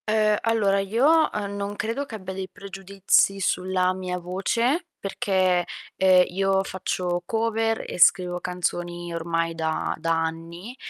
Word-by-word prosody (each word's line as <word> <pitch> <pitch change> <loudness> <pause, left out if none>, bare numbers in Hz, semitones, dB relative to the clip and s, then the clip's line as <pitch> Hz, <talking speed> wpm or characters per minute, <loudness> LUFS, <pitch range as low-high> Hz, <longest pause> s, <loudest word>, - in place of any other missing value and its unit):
Uhm, 215 -1 +3
allora 210 -4 +2
io, 265 +11 +3
uhm, 200 -1 -4
non 200 0 -4
credo 230 +7 -3
che 230 - -8
abbia 190 -2 -7
dei 190 0 -5
pregiudizi 195 0 0
sulla 185 0 +1
mia 185 -1 -4
voce, 230 - -1
perché, 185 -2 +1 0.3
ehm, 185 -1 +5
io 195 +1 +1
faccio 180 -2 -2
cover 225 +2 0
e - - -6
scrivo 180 +1 +4
canzoni 175 -1 -3
ormai 165 0 -1
da 160 -1 -2
da 165 0 +1
anni, 170 +7 -6
190 Hz, 140 wpm, -24 LUFS, 175-210 Hz, 0.3 s, ehm